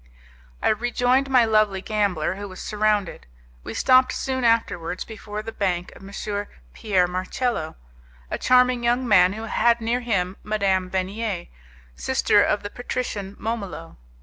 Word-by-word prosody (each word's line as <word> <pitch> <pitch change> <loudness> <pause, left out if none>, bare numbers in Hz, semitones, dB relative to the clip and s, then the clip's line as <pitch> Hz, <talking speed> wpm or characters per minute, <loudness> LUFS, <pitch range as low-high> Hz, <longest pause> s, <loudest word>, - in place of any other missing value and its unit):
I - - +4
rejoined 245 +4 +1
my 250 -3 +5
lovely 215 -3 +2
gambler, 195 -6 0
who 200 +1 -7
was 185 - -10
surrounded. 210 -2 -1 0.4
We - - -7
stopped 255 0 +4
soon 260 -1 -2
afterwards 185 -7 0
before 215 -1 -7
the 225 - -6
bank 180 -5 -2
of - - -14
M. 195 +1 -11 0.6
Pierre 185 -4 +1
Marcello, 185 0 -2 0.6
a - - -2
charming 250 -1 +4
young 245 +2 +1
man, 185 -3 +5
who 220 +2 -6
had 235 +1 +2
near 230 +2 0
him 195 -6 -1
Madame 195 -3 0
Venier, 190 +1 -3 0.5
sister 260 -5 +2
of 205 0 +1
the 205 - -6
patrician 215 -5 -4
Momolo. 200 -7 -5
215 Hz, 145 wpm, -23 LUFS, 190-235 Hz, 0.6 s, my